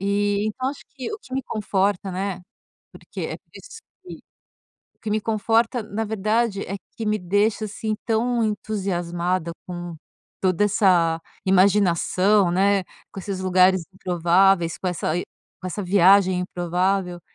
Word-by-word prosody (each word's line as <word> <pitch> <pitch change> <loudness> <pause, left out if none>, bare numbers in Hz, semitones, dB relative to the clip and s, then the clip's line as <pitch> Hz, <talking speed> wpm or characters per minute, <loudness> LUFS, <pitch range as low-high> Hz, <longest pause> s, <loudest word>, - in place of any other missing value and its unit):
Eh, 200 +1 0
então 255 +4 -2
acho 285 - -11
que 270 - -6
o 425 - -5
que 260 - -17
me 265 - -1
conforta, 200 -4 -1
né? 190 -1 -3 0.5
Porque - - -10
é - - -4
por - - -31
isso - - -12 0.2
que 370 - -9 0.8
o - - -46
que 215 - -5
me 215 +1 +1
conforta, 225 +2 +1
na 215 +1 -4
verdade, 215 0 0
é 195 - -4 0.2
que 225 - -4
me 210 0 +1
deixa, 205 +4 +1
assim, 215 +1 -3
tão 235 +1 +1
entusiasmada 185 -5 -2
com 175 -2 -6 0.4
toda 185 +1 +2
essa 175 -5 +3 0.3
imaginação, 190 0 +3
né, 195 +2 +2 0.3
com - - -8
esses 195 -1 -5
lugares 185 -1 +4
improváveis, 180 -1 +2
com 185 - -2
essa 170 -2 -2
e 180 - -2 0.4
com 185 - -6
essa 205 +3 -4
viagem 190 0 +4
improvável. 180 0 -1
195 Hz, 150 wpm, -23 LUFS, 180-215 Hz, 0.8 s, lugares